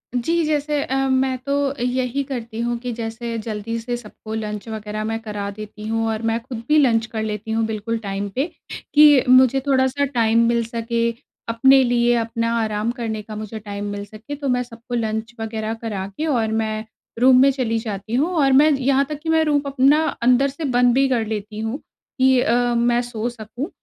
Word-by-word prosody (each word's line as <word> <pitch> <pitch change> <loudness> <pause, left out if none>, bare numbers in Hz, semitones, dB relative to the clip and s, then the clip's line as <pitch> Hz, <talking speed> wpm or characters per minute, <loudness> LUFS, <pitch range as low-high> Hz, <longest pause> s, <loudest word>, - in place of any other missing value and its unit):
जी, 330 +7 +1
जैसे 295 -1 0
अ, 265 - -3
मैं 260 0 +1
तो 280 - -1 0.3
यही 250 +2 0
करती 235 -4 -6
हूँ 240 0 -1
कि 245 0 -4
जैसे 230 +1 -4
जल्दी 220 +1 -4
से 240 +1 -3
सबको 220 -1 -10
लंच 210 0 -4
वग़ैरह 215 -1 -4
मैं 225 +1 -2
करा 205 -2 -4
देती 210 +1 -9
हूँ 225 0 0
और 220 0 -2
मैं 225 +1 0
खुद 235 -2 -7
भी 305 +1 +4
लंच 230 -6 +3
कर 220 0 -4
लेती 215 0 -4
हूँ 225 0 +1
बिल्कुल 220 +1 -3
टाइम 200 -1 -4
पे, 270 +4 +1 0.5
कि 295 -3 +7
मुझे 260 +1 +6
थोड़ा-सा 265 +1 +2
टाइम 230 -3 +2
मिल 235 0 +2
सके। 230 0 -1 0.4
अपने 265 +3 +5
लिए 240 0 +2
अपना 230 0 -1
आराम 215 +1 -1
करने 225 -4 -4
का 215 0 -9
मुझे 215 +1 -6
टाइम 205 -1 -6
मिल 205 0 -5
सके 220 +7 -8
तो 285 -1 -5
मैं 250 - -1
सबको 235 0 -8
लंच 220 0 -2
वग़ैरह 220 0 -3
करा 205 -4 -3
के 310 - -1
और 235 -6 +1
मैं 215 0 -3 0.3
रूम 255 0 +6
में 275 - +6
चली 240 -4 -1
जाती 215 -1 -6
हूँ 320 +7 +1
और 275 -2 +4
मैं 295 +3 +6
यहाँ 275 0 +2
तक 300 -1 -5
कि 320 - -3
मैं 320 0 +4
रूम 295 -2 +2
अपना 280 +3 +3 0.2
अंदर 250 +3 +4
से 280 +4 -8
बंद 245 -2 +3
भी 270 0 +4
कर 235 -3 +1
लेती 210 0 -5
हूँ। 225 +6 -3 0.4
ये 260 -1 +5
अ, 240 0 +2
मैं 240 +1 +2
सो 240 -1 -3
सकूँ, 240 - -7
235 Hz, 200 wpm, -21 LUFS, 220-260 Hz, 0.5 s, कि